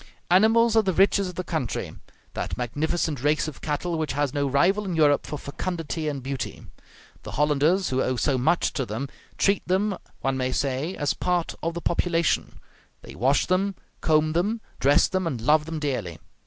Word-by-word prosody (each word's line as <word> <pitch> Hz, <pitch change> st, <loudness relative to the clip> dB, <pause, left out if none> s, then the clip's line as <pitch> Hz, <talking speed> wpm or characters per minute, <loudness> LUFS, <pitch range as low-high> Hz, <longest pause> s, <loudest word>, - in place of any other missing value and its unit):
Animals 225 Hz, +4 st, +5 dB
are 220 Hz, -, +6 dB
the 190 Hz, -3 st, 0 dB
riches 195 Hz, 0 st, +3 dB
of 180 Hz, -, -9 dB
the 185 Hz, -, -3 dB
country; 160 Hz, -9 st, -3 dB, 0.4 s
that -, -, -4 dB
magnificent 145 Hz, +3 st, -1 dB
race 150 Hz, +2 st, +1 dB
of 155 Hz, -, -8 dB
cattle 160 Hz, +3 st, -2 dB
which 155 Hz, -5 st, -1 dB
has 145 Hz, -1 st, 0 dB
no 145 Hz, -1 st, 0 dB
rival 175 Hz, +10 st, +2 dB
in 185 Hz, -4 st, -3 dB
Europe 145 Hz, -3 st, +3 dB
for 150 Hz, -, -4 dB
fecundity 160 Hz, +2 st, -4 dB
and 140 Hz, -3 st, -3 dB
beauty. 135 Hz, -1 st, -5 dB, 0.6 s
The -, -, -8 dB
Hollanders, 150 Hz, +6 st, +2 dB
who 130 Hz, 0 st, +1 dB
owe 130 Hz, -, 0 dB
so 135 Hz, +3 st, +1 dB
much 170 Hz, +7 st, +2 dB
to 135 Hz, -, -1 dB
them, 125 Hz, +6 st, -4 dB, 0.3 s
treat 200 Hz, 0 st, +2 dB
them, 195 Hz, +2 st, +1 dB, 0.3 s
one 135 Hz, -1 st, 0 dB
may 130 Hz, 0 st, -1 dB
say, 140 Hz, +7 st, -1 dB
as 145 Hz, -2 st, 0 dB
part 180 Hz, -2 st, -1 dB
of 165 Hz, +1 st, -2 dB
the 170 Hz, -, -4 dB
population; 170 Hz, -1 st, 0 dB, 0.4 s
they -, -, -10 dB
wash 135 Hz, +5 st, +2 dB
them, 190 Hz, +2 st, +1 dB, 0.3 s
comb 155 Hz, 0 st, +2 dB
them, 205 Hz, +7 st, 0 dB, 0.2 s
dress 140 Hz, +2 st, +4 dB
them, 185 Hz, -3 st, -1 dB
and 135 Hz, -7 st, -2 dB
love 150 Hz, +6 st, +3 dB
them 165 Hz, -1 st, -4 dB
dearly. 125 Hz, -, -3 dB
155 Hz, 185 wpm, -25 LUFS, 140-180 Hz, 0.6 s, are